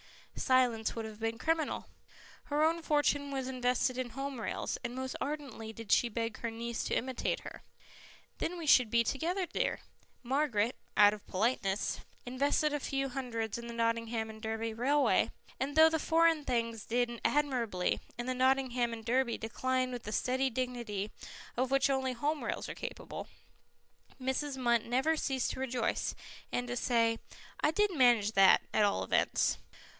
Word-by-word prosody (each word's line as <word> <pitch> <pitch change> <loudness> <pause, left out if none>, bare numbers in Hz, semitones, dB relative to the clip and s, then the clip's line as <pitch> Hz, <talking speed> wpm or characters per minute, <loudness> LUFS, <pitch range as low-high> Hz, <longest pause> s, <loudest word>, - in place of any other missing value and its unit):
Silence 245 -4 +2
would 225 -1 -4
have 215 -1 -9
been 225 0 -2
criminal. 320 +4 0 0.6
Her 295 +1 +1
own 330 +1 +2
fortune 290 -2 +1
was 265 -2 -3
invested 250 0 0
in 250 -2 -3
Home 270 -2 -4
Rails, - - -2
and 240 - -4
most 260 0 -4
ardently 275 -7 -4
did 225 -1 -8
she 240 - +4
beg 230 0 -3
her 230 - -2
niece 230 +1 -4
to - - 0
imitate 255 0 -1
her. - - -9 0.8
"Then 355 +2 -2
we 335 - -5
should 250 -6 +6
be 235 +1 +3
together, 345 - -1
dear." - - -1 0.4
Margaret, 250 -4 +1 0.2
out 205 0 +7
of 210 - -10
politeness, 205 -1 0 0.3
invested 285 +4 +1
a 295 - 0
few 275 0 -2
hundreds 235 -4 -3
in 235 - -7
the 235 - -6
Nottingham 230 -1 -1
and 220 0 -12
Derby 225 0 -2
Railway, 275 +6 +3 0.3
and 280 +2 -2
though 320 +1 +8
the 320 0 0
Foreign 325 -1 +3
Things 230 -3 -1
did 240 0 0
admirably 245 -11 +1 0.2
and 240 +1 -4
the 255 - 0
Nottingham 255 -2 +2
and 225 -1 -8
Derby 245 0 +1
declined 255 +3 -1
with 245 -1 -5
the 210 - -5
steady 260 +5 +1
dignity 235 -5 -3 0.4
of 255 +1 0
which 275 +1 +3
only 265 -1 0
Home 290 +5 -1
Rails - - -3
are - - -5
capable, - - -7 0.9
Mrs. 265 +2 -2
Munt 235 -3 +2
never 260 +7 +2
ceased 270 -4 -1
to - - -6
rejoice, 255 -2 -1 0.4
and 245 0 -1
to 245 - -3
say, 230 -2 +2 0.4
"I - - +3
did 410 +4 +2
manage 240 -6 +5
that, 195 -3 +6
at 215 - +4
all 200 -1 +2
events. - - +1
250 Hz, 170 wpm, -32 LUFS, 230-275 Hz, 0.9 s, though